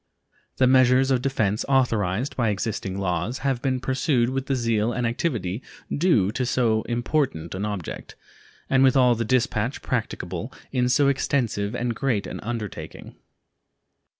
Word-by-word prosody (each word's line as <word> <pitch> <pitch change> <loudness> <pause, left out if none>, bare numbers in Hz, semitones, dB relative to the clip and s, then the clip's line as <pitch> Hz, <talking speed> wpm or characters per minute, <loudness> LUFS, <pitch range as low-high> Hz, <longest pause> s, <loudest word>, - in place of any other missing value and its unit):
The 130 - +4
measures 130 +1 +5
of 130 -2 +2
defense 110 -6 0
authorized 115 -3 +1
by 115 -3 +1
existing 100 -2 -3
laws 95 +5 -1
have 135 -3 0
been 130 -2 0
pursued 130 -1 +1
with 135 0 -3
the 135 - +1
zeal 115 -2 +1
and 125 0 -1
activity 115 - -2 0.3
due 145 - +3
to 125 +3 -2
so 120 -3 +1
important 120 - -1
an 95 +2 -3
object, 100 -5 -6 0.5
and 130 0 +3
with 135 0 +5
all 125 -2 +5
the 115 0 -1
dispatch 115 0 0
practicable 110 -3 -3 0.2
in 125 -2 +1
so 140 +2 +4
extensive 120 -7 0
and 120 0 -1
great 115 -3 -1
an - - -6
undertaking. 105 -8 -6
120 Hz, 150 wpm, -24 LUFS, 105-130 Hz, 0.5 s, measures